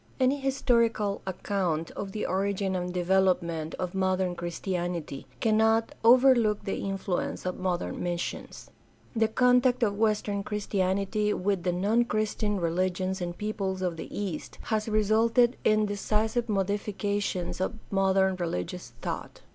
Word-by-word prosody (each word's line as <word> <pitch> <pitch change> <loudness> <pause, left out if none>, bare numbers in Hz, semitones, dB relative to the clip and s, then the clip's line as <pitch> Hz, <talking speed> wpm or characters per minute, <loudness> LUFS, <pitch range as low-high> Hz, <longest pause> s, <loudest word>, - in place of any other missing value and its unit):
— - - -30
^Any 265 +2 +2
historical 235 -6 +1
account 180 -4 -1
of 200 -1 -6
the 210 - -3
origin 195 0 0
and 180 0 -2
development 180 -3 +1
of 180 -1 -4
modern 185 -1 +1
Christianity 175 -4 -4
cannot 220 +1 +3
overlook 235 -3 +5
the 195 - -3
influence 195 -2 -3
of 180 - -3
modem 185 -2 -2
missions. 175 -1 -4 0.4
The 225 -1 +3
contact 250 +2 +3
of 205 -3 +1
Western 210 -2 +1
Christianity 200 +1 0
with 195 0 0
the 180 +1 0
non 205 +7 +2
Christian 210 -2 -1
religions 185 +2 -1
and 175 0 -4
peoples 195 -3 -2
of 180 -2 -1
the 165 - -7
East 190 -7 -5
has 220 -1 -1
resulted 225 +3 +3
in 215 0 +3
decisive 215 +3 -1
modifications 200 -2 -1
of 190 - -1 0.2
modern 190 -1 +2
religious 165 - -4
thought. - - -5
195 Hz, 130 wpm, -28 LUFS, 180-215 Hz, 0.4 s, overlook